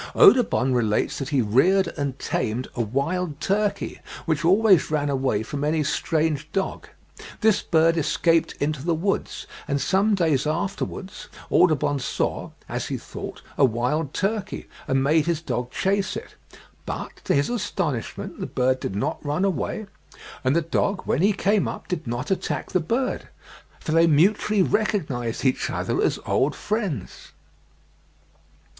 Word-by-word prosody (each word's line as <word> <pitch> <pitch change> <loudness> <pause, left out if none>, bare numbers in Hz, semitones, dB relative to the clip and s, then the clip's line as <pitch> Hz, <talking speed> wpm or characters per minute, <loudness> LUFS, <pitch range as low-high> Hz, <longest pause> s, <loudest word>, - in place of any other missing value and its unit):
Audubon 245 - +5
relates 110 -4 +1
that 135 -1 -4
he 135 -4 +2
reared 170 - +3
and 140 -3 -3
tamed 120 0 -2
a 120 - -1
wild 145 - -1
turkey 200 +3 -1 0.3
which 160 0 0
always 190 +1 +5
ran 145 -2 0
away 130 -6 0
from 140 +5 -4
any 155 +1 +1
strange 155 0 0
dog; 195 - -2 0.5
this 220 -2 +4
bird 165 0 +3
escaped 165 +2 +2
into 145 -1 -1
the 170 0 +1
woods, 195 +5 -2 0.2
and 140 - 0
some 200 +7 +2
days 155 -6 +1
afterwards 190 +3 -3 0.2
Audubon 150 -4 +3
saw, 125 - -2 0.2
as - - -3
he - - -2
thought, - - -8 0.2
a - - +6
wild 130 +5 +1
turkey, 205 +1 -2 0.2
and 135 0 +2
made 155 +3 +3
his 170 -3 +1
dog 125 -6 -3
chase 195 +4 0
it; - - -9 0.5
but, - - -5
to - - +1
his 140 0 +2
astonishment, 190 - -3
the - - -3
bird 130 +1 +1
did 95 - -4
not 100 - -2
run 150 +6 0
away, 195 +4 -2 0.6
and 130 +3 +2
the 170 - +3
dog, 190 +4 0
when - - +1
he 200 +3 +5
came 200 0 +1
up, - - -6
did 170 -7 -3
not 120 +9 -3
attack 190 - -2
the 185 - +2
bird, 235 +11 -1 0.5
for - - -4
they 165 +1 +5
mutually 195 +6 +3
recognised 145 - -1
each 130 - +1
other - - -1
as - - +1
old 140 +3 +1
friends. 205 - -4
160 Hz, 150 wpm, -24 LUFS, 135-195 Hz, 0.6 s, a